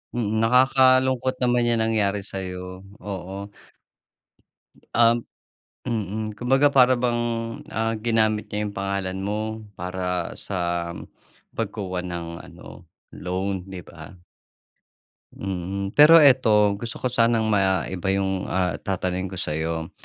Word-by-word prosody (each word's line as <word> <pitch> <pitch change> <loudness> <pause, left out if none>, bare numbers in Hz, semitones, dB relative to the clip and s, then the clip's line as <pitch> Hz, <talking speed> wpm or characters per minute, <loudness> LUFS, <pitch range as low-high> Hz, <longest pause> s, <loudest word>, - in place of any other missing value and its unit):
Mm. 110 -2 0
Nakakalungkot 130 +1 +4
naman 120 -1 +2
'yang 115 -1 +2
nangyari 105 -3 0
sa'yo. 90 -1 -6 0.2
Oo. 100 0 -6 1.4
Um, 115 0 +4 0.6
mm. 110 -2 -3
Kumbaga 135 +4 +3
para 130 -2 +6
bang, 120 -1 0 0.5
ah 115 0 0
ginamit 110 -1 +1
niya 105 +1 -3
'yong 105 -1 -5
pangalan 95 -1 -2
mo 100 +2 -2 0.4
para 90 -1 -3
sa 85 -3 -2 0.7
pagkuha 100 -4 -3
ng 85 -2 -5
ano, 90 -1 -13 0.3
loan, 95 +1 -4
'di 95 -2 -7
ba? 80 +2 -12 1.2
Mm, 95 +1 -4
pero 155 +4 +8
ito 105 -7 +4
gusto 115 0 -5
ko 125 - 0
sanang 115 -2 +2
maiba 95 -2 0
'yong 95 -1 0
ah, 90 -5 -1
tatanungin 95 0 -2
ko 95 - -8
sa'yo. 80 0 -3
100 Hz, 115 wpm, -24 LUFS, 95-115 Hz, 1.4 s, pero